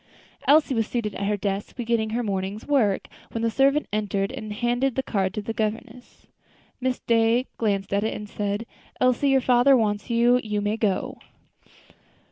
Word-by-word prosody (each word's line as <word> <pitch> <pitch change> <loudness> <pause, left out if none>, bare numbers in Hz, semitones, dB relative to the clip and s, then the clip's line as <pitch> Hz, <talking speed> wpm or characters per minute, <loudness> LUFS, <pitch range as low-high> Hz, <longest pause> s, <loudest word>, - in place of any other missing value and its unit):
Elsie 290 0 +5
was 225 -3 0
seated 225 -4 -2
at 200 - -3
her 210 0 0
desk, 200 0 -3
beginning 235 -2 0
her 235 +2 -1
morning's 195 0 -3
work, 235 -10 +1 0.3
when 230 - -2
the 230 - +1
servant 275 +4 +3
entered 200 -2 -1
and 215 -1 -7
handed 240 +4 0
the 265 - 0
card 190 -6 -1
to 210 +1 -5
the 225 - -4
governess. 225 +3 -5 0.5
Miss 255 0 -1
Day 230 +2 +2
glanced 200 -3 -1
at 200 +1 +1
it 220 - -1
and 210 - -7
said: 205 +2 -3 0.3
"Elsie, 255 +2 +3
your 270 -1 +4
father 250 +2 +5
wants 210 -2 -1
you. 240 +1 +3
You 210 -1 -2
may 205 +1 0
go." 210 -4 -1
225 Hz, 175 wpm, -24 LUFS, 205-245 Hz, 0.5 s, Elsie